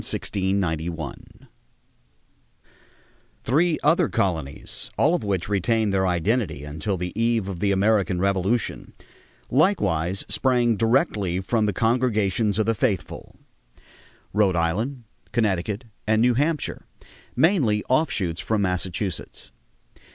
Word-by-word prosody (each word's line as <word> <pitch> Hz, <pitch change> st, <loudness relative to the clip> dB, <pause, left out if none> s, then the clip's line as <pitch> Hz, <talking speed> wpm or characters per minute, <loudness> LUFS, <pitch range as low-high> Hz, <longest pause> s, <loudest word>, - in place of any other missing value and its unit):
[Illustration: 95 Hz, 0 st, -1 dB
THE -, -, +1 dB
ORIGINAL 80 Hz, +1 st, -3 dB
GRANTS] 80 Hz, -4 st, -8 dB, 2.1 s
Three 160 Hz, +6 st, +2 dB
other 165 Hz, +2 st, +3 dB
colonies, 80 Hz, -10 st, -3 dB
all 155 Hz, +5 st, +3 dB
of 175 Hz, -, 0 dB
which 95 Hz, -4 st, -1 dB
retained 105 Hz, +2 st, +1 dB
their 95 Hz, -1 st, +2 dB
identity 90 Hz, -, 0 dB
until 80 Hz, +7 st, -3 dB
the 90 Hz, 0 st, -4 dB
eve 115 Hz, -2 st, +1 dB
of 95 Hz, -3 st, -5 dB
the 100 Hz, +2 st, +1 dB
American 100 Hz, -1 st, +2 dB
Revolution, 100 Hz, +4 st, -1 dB, 0.6 s
likewise 100 Hz, -, +1 dB
sprang 120 Hz, -3 st, +2 dB
directly 110 Hz, -, +1 dB
from 110 Hz, +3 st, 0 dB
the 105 Hz, -, 0 dB
congregations 110 Hz, -3 st, +1 dB
of 110 Hz, -, +2 dB
the 115 Hz, -, +2 dB
faithful: 105 Hz, -4 st, -2 dB, 1.0 s
Rhode 105 Hz, -4 st, +3 dB
Island, 110 Hz, +11 st, -1 dB, 0.3 s
Connecticut, 105 Hz, 0 st, 0 dB, 0.2 s
and 110 Hz, 0 st, +3 dB
New 120 Hz, +2 st, +4 dB
Hampshire, 150 Hz, +4 st, -1 dB, 0.5 s
mainly 135 Hz, -, +3 dB
offshoots 105 Hz, -, 0 dB
from 110 Hz, -2 st, 0 dB
Massachusetts. 90 Hz, 0 st, -3 dB
105 Hz, 115 wpm, -24 LUFS, 95-120 Hz, 2.1 s, New